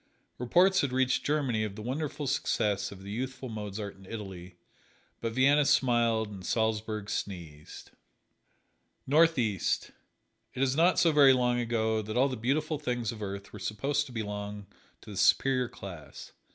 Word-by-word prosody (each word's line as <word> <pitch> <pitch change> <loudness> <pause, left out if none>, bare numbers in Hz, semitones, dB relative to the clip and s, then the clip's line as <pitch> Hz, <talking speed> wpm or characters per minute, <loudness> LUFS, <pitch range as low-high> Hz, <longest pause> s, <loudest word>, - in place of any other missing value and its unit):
Reports 180 +10 +4
had 140 - -1
reached 130 0 +1
Germany 135 -7 0
of 105 -2 -4
the 110 - -7
wonderful 145 +4 -3
success 105 -7 0
of 95 -1 -11
the 100 - -7
youthful 130 +3 -4
Mozart 105 -2 -5
in 95 -1 -16
Italy, 95 -5 -8 0.6
but 115 -1 -3
Vienna 140 +4 +4
smiled 115 -5 +2
and 95 -2 -9
Salzburg 110 -1 -1
sneezed. 85 -8 -6 1.1
North 160 +3 +4
East: 110 -6 0 0.6
It 130 - 0
is 135 0 +1
not 170 +4 +4
so 165 - +4
very 140 -3 +7
long 125 -1 +1
ago 110 -2 0
that 110 +2 -4
all 135 +2 +4
the 130 - -3
beautiful 145 +6 -1
things 120 -5 -2
of 110 -2 -9
earth 100 0 -6
were - - -8
supposed 140 +7 -1
to - - -11
belong 105 -2 -5 0.4
to - - -11
the 100 - -7
Superior 125 +5 +3
Class. 90 -6 -10
115 Hz, 160 wpm, -29 LUFS, 105-135 Hz, 1.1 s, very